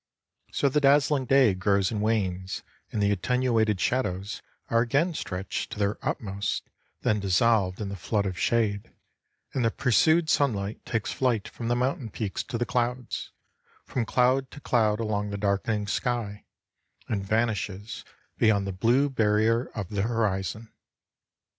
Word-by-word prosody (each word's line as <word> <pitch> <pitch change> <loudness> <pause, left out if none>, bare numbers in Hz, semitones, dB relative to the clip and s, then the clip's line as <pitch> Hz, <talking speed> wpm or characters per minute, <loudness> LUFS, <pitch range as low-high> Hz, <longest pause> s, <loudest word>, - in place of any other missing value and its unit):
So 140 - +1
the 145 +2 +2
dazzling 140 -1 +4
day 130 -4 +5
grows 100 +1 +1
and 105 -2 -2
wanes 95 -4 -1 0.3
and 105 - 0
the 100 - +3
attenuated 110 0 +1
shadows 100 -5 -1 0.3
are 115 0 +3
again 140 +9 +1
stretched 95 -9 -4
to - - -8
their 100 0 0
utmost, 100 -1 -2 0.4
then 105 - +1
dissolved 100 -1 +2
in 105 -2 -3
the 100 - -5
flood 100 +3 -1
of 95 -2 -2
shade, 105 +1 0 0.6
and 130 - 0
the 115 - +4
pursued 160 +8 +3
sunlight 110 -10 0
takes 115 -3 -1
flight 120 -6 0
from 115 - -6
the 120 - +2
mountain 125 -1 -1
peaks 100 +2 -3
to 125 - -3
the 120 - 0
clouds, 125 0 -2 0.5
from 120 -3 -2
cloud 130 +1 +2
to 145 - -11
cloud 110 -6 +2
along 105 -2 -1
the 100 - -4
darkening 105 +1 0
sky, 105 -1 -2 0.6
and 100 -3 -2
vanishes 105 -1 -2 0.4
beyond 105 -3 +3
the 100 - -2
blue 120 +9 +3
barrier 115 -1 +2
of 100 -5 -4
the 100 -2 -1
horizon. 110 -1 -1
110 Hz, 150 wpm, -27 LUFS, 100-125 Hz, 0.6 s, day